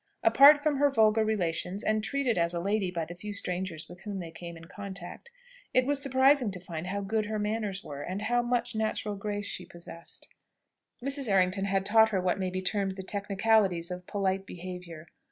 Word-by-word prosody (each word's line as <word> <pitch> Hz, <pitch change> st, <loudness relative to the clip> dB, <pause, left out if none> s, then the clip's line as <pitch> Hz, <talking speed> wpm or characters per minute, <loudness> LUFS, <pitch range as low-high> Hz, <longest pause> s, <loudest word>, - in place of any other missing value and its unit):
Apart 285 Hz, +2 st, +8 dB
from 295 Hz, -1 st, +1 dB
her 285 Hz, +1 st, +4 dB
vulgar 220 Hz, -4 st, +4 dB
relations, 185 Hz, -2 st, -1 dB
and 215 Hz, 0 st, +1 dB
treated 275 Hz, -2 st, +1 dB
as 170 Hz, 0 st, +1 dB
a -, -, -1 dB
lady 200 Hz, +1 st, 0 dB
by 170 Hz, -2 st, -3 dB
the 170 Hz, -, -8 dB
few 205 Hz, +4 st, -7 dB
strangers 180 Hz, -4 st, -3 dB
with 175 Hz, 0 st, -13 dB
whom 205 Hz, -2 st, -5 dB
they 170 Hz, -3 st, -6 dB
came 170 Hz, 0 st, -9 dB
in 165 Hz, -, -12 dB
contact, 200 Hz, -, -8 dB, 0.5 s
it 255 Hz, 0 st, +5 dB
was 285 Hz, 0 st, 0 dB
surprising 265 Hz, -2 st, +4 dB
to 190 Hz, -2 st, -6 dB
find 170 Hz, -1 st, -6 dB
how 200 Hz, +2 st, -2 dB
good 210 Hz, +2 st, -1 dB
her 215 Hz, 0 st, -2 dB
manners 210 Hz, -2 st, -2 dB
were, 145 Hz, -1 st, -7 dB
and 185 Hz, +7 st, -4 dB
how 240 Hz, +3 st, +2 dB
much 240 Hz, 0 st, -1 dB
natural 215 Hz, -1 st, -1 dB
grace 205 Hz, 0 st, -4 dB
she -, -, -4 dB
possessed. 170 Hz, -1 st, -10 dB, 0.8 s
Mrs. 275 Hz, -2 st, -1 dB
Errington 195 Hz, 0 st, +2 dB
had 195 Hz, -1 st, 0 dB
taught 220 Hz, +2 st, +5 dB
her 200 Hz, -3 st, 0 dB
what 180 Hz, +1 st, 0 dB
may 185 Hz, -1 st, -1 dB
be 185 Hz, +1 st, -4 dB
termed 195 Hz, 0 st, 0 dB
the 190 Hz, 0 st, -7 dB
technicalities 200 Hz, -3 st, +1 dB
of 180 Hz, 0 st, -7 dB
polite 195 Hz, -1 st, -1 dB
behaviour. 180 Hz, -2 st, -8 dB
200 Hz, 200 wpm, -29 LUFS, 180-220 Hz, 0.8 s, Apart